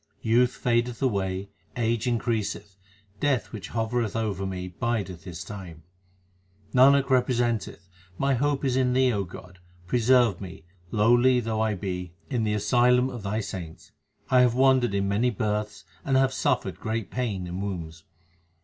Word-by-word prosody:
Youth 120 +3 +3
fadeth 120 -1 0
away, 100 -5 -1 0.3
age 115 0 0
increaseth, 110 -4 -2 0.4
Death 140 -2 0
which 105 -6 -7
hovereth 115 -1 -1
over 100 -4 -2
me 90 -1 -4
bideth 95 -3 -3
his 85 -2 -7
time. 90 -6 -9 0.9
Nanak 135 +1 +5
representeth, 120 -7 0 0.3
my 135 +5 +1
hope 140 +2 0
is 130 -2 +1
in 130 -1 +2
Thee, 130 -1 +3
O 100 -2 0
God; 90 0 -12 0.3
preserve 120 -1 +3
me, 90 -4 -9 0.3
lowly 120 +4 +4
though 110 -2 -2
I 110 -1 +1
be, 90 -2 -5 0.2
in 120 -4 0
the 105 0 0
asylum 125 +4 +3
of 120 - -7
Thy 105 +3 -2
saints. 85 -5 -8 0.4
I 130 -1 +6
have 125 -1 +3
wandered 130 -4 +3
in 100 0 0
many 105 +5 +2
births 105 -2 -2 0.2
and 135 -1 +2
have 135 0 +3
suffered - - -1
great 110 -2 -3
pain 110 -8 -2
in 90 +2 -5
wombs. 85 -5 -5
110 Hz, 150 wpm, -26 LUFS, 95-125 Hz, 0.9 s, I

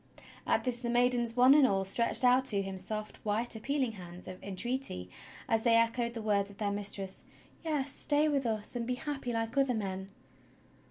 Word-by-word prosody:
At - - +2
this 245 -2 -3
the 240 - -3
maidens 240 -1 +2
one 250 +2 +7
and 290 -2 +6
all 195 -3 0
stretched 235 +6 +2
out 250 +1 +5
to 200 -6 +5
him 195 -1 -6
soft, 215 +3 -4
white, 220 +3 -1
appealing 265 +2 -1
hands 180 -4 -10
of 185 - -9
entreaty 200 - -2 0.4
as 225 -1 +2
they 230 0 +3
echoed 235 +1 +1
the 225 - -5
words 200 -2 +1
of 200 - -14
their 205 -1 -1
mis 200 0 -1
tress: 195 -1 -2 0.4
"Yes, 295 -4 -1
stay 295 +3 +1
with 280 -4 0
us 215 +1 -3
and 235 -1 -3
be 250 - -1
happy 275 -2 -4
like 225 +1 -2
other 270 -3 +2
men." 190 -2 -4
230 Hz, 200 wpm, -31 LUFS, 200-255 Hz, 0.4 s, one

